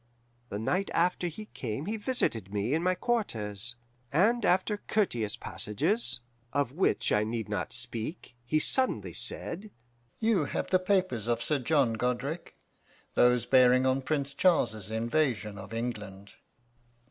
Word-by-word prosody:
The 100 - -4
night 180 - 0
after 175 +1 +2
he 195 +6 -7
came 125 - -5
he 215 - -2
visited 205 - -1
me 105 +5 -1
in 160 - +1
my 185 +1 +2
quarters, 120 - -1 0.4
and 220 +10 +3
after 190 +4 +2
courteous 120 - -1
passages, 125 - +1 0.3
of 140 -4 0
which 175 +7 +1
I 105 - +3
need 110 0 -3
not 105 0 -3
speak, 125 +3 -4
he 140 +6 0
suddenly 260 +11 +2
said, 195 +6 0 0.5
'You 220 -8 +2
have - - -3
the 185 - +5
papers 185 - 0
of 120 -1 0
Sir 150 -2 +1
John 135 -3 +2
Godric 125 +8 -3 0.6
those 125 -1 +4
bearing 130 0 +5
on 130 +1 +2
Prince 140 0 -2
Charles's 110 - +2
invasion 115 -2 0
of 95 +1 -10
England? 105 -4 -5
130 Hz, 140 wpm, -29 LUFS, 115-180 Hz, 0.6 s, the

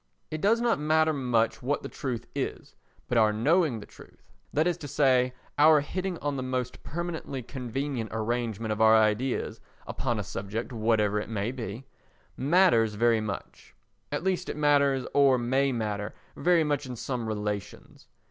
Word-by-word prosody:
It 155 0 -4
does 225 +3 +3
not 240 -7 +2
matter 155 +1 +3
much 115 -5 0
what 140 +4 -1
the - - -4
truth 125 -5 -4
is, 140 -1 -4 0.3
but 120 - +2
our 110 -1 +4
knowing 140 +3 +2
the 105 - -10
truth—that 155 +2 -6
is 175 -1 +1
to 145 - -8
say 130 -3 +2 0.2
our 155 0 +7
hitting 185 +4 -3
on 145 -1 -1
the - - -2
most 130 -1 -3
permanently 160 -5 -5
convenient 125 -1 -4
arrangement 110 -1 -2
of 110 +1 -2
our 110 0 +7
ideas 110 +4 +1 0.2
upon - - -2
a - - -2
subject 105 +5 -5
whatever 110 -2 +1
it 105 - -6
may 110 +1 -2
be—matters 130 - 0
very 115 0 +3
much; 105 -2 -7 0.4
at - - -2
least 185 -1 -1
it - - -4
matters, 140 -3 +3
or 140 -2 +5
may 130 +3 +1
matter, 105 -4 -3 0.2
very 175 -2 +3
much 145 -2 -1
in 125 - -5
some 120 -1 -4
relations. 105 -2 -5
125 Hz, 160 wpm, -28 LUFS, 110-145 Hz, 0.4 s, our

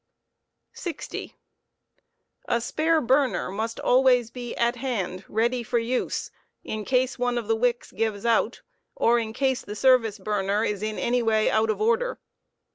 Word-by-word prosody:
spare - - -7
burner. 335 - -3
60. - - -7 1.1
A 235 - +1
spare 315 +6 +1
burner 265 -5 +1
must 220 +3 -3
always 250 -2 +4
be 245 -2 -6
at 235 +1 +1
hand, 200 -8 -3
ready 235 +3 0
for 235 +1 -1
use, 235 +2 -2 0.3
in 215 -1 -4
case 255 +2 0
one 245 0 0
of 230 -3 -3
the 225 - +2
wicks 240 +1 0
gives, 220 -2 -2
out, 230 0 +1 0.3
or 240 +1 +3
in 220 -1 -3
case 260 +2 0
the 210 - -8
service 235 -3 +3
burner 205 +1 0
is 205 -3 -2
in 215 0 -3
any 245 +1 +1
way 220 -1 +2
out 220 0 +2
of 215 - 0
order. 470 +3 +1
235 Hz, 165 wpm, -25 LUFS, 220-255 Hz, 1.1 s, always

